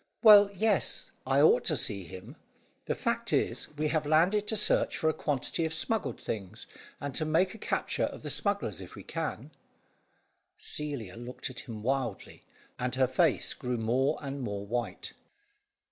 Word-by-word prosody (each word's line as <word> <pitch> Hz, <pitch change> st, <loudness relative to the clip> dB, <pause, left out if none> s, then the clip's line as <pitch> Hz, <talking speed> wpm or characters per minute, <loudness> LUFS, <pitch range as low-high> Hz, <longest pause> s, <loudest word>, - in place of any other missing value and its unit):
"Well, 205 Hz, -2 st, +9 dB
yes, 210 Hz, 0 st, +1 dB, 0.2 s
I 135 Hz, +1 st, +4 dB
ought 140 Hz, -, +5 dB
to -, -, +2 dB
see 100 Hz, -4 st, 0 dB
him. 95 Hz, +2 st, -10 dB, 0.5 s
The -, -, -1 dB
fact -, -, -1 dB
is, -, -, 0 dB
we 155 Hz, 0 st, 0 dB
have 155 Hz, -1 st, 0 dB
landed 180 Hz, +7 st, +3 dB
to 220 Hz, -, 0 dB
search 210 Hz, -, +3 dB
for 160 Hz, -, +2 dB
a -, -, +1 dB
quantity 145 Hz, +3 st, -2 dB
of 160 Hz, 0 st, -1 dB
smuggled 225 Hz, +6 st, -1 dB
things, 100 Hz, -4 st, -6 dB, 0.3 s
and 145 Hz, -1 st, -4 dB
to 155 Hz, -, 0 dB
make 165 Hz, +4 st, +2 dB
a 220 Hz, -, -11 dB
capture -, -, -1 dB
of -, -, -7 dB
the -, -, -2 dB
smugglers 200 Hz, -, 0 dB
if 90 Hz, -, -10 dB
we -, -, -10 dB
can." -, -, -4 dB, 1.1 s
Celia 135 Hz, -10 st, -3 dB
looked 120 Hz, +2 st, -6 dB
at 130 Hz, -, -7 dB
him 110 Hz, -2 st, -6 dB
wildly, 130 Hz, -4 st, -2 dB, 0.4 s
and 125 Hz, 0 st, -1 dB
her 130 Hz, 0 st, +4 dB
face 135 Hz, +4 st, +1 dB
grew 125 Hz, -1 st, -3 dB
more 125 Hz, +6 st, +1 dB
and 140 Hz, 0 st, -4 dB
more 100 Hz, -4 st, -4 dB
white. 120 Hz, +3 st, -4 dB
135 Hz, 170 wpm, -30 LUFS, 120-160 Hz, 1.1 s, Well